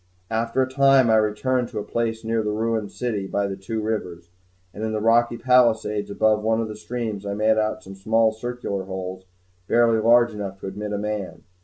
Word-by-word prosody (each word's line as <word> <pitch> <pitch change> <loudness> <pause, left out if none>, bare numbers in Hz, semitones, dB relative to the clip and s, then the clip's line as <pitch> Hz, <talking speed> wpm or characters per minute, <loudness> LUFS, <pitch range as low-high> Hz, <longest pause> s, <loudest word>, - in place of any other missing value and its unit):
After 115 +3 +1
a - - -2
time 135 -2 +4
I 110 - +5
returned 120 +4 0
to - - -8
a 105 - -2
place 115 0 -2
near 115 0 0
the 105 - -2
ruined 110 -1 -1
city 110 -6 -3
by 100 +1 -1
the 100 -1 -3
two 100 +4 -5
rivers; 90 -6 -4 0.4
and 105 - -6
in 110 0 -2
the 110 - -1
rocky 120 +2 +3
palisades 115 -5 +2
above 105 +1 +2
one 110 +1 +1
of 115 - -1
the 105 - -7
streams, 110 -1 -4
I 100 0 -3
made 110 +1 +2
out 110 0 -1
some 95 - -10
small 110 +3 +2
circular 110 -4 -4
holes 95 0 -6 0.4
barely 115 0 +3
large 120 +2 +5
enough 100 -2 -6
to - - -7
admit 105 +2 -5
a 105 - -1
man. 105 -2 -4
110 Hz, 205 wpm, -23 LUFS, 105-115 Hz, 0.4 s, I